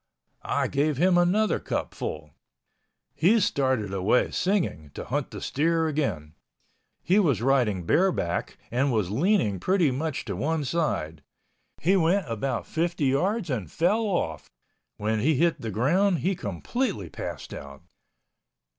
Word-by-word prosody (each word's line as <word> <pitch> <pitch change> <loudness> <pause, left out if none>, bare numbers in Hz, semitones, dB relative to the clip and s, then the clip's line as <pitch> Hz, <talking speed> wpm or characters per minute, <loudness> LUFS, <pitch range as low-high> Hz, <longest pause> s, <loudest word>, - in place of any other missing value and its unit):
I - - 0
gave 145 0 0
him 180 +4 +4
another 180 +5 +3
cupful. - - -4 0.8
He 205 +8 +4
started 130 - 0
away 100 +6 +2
singing, 180 - -1
to - - -6
hunt - - -2
the - - -8
steer 165 +3 +1
again. 105 - -2 0.7
He 190 +4 +3
was 140 - +2
riding 120 -9 +2
bareback 125 - +1
and 130 +3 +1
was 105 -6 0
leaning 135 - +1
pretty 180 - +2
much 150 +3 -3
to 100 -5 -4
one 150 - -1
side. 125 - -1 0.6
He 185 +5 +3
went 180 +1 +2
about 115 +2 -2
50 165 -2 -1
yards 180 - 0
and 105 -11 -3
fell 190 +7 +2
off. 80 - -2 0.5
When 110 +1 -1
he 150 +7 +2
hit 170 +4 +1
the 115 - -4
ground, 170 - +2
he 195 - +2
completely 105 - -3
passed - - -6
out. 70 -1 -10
145 Hz, 135 wpm, -26 LUFS, 110-175 Hz, 0.8 s, him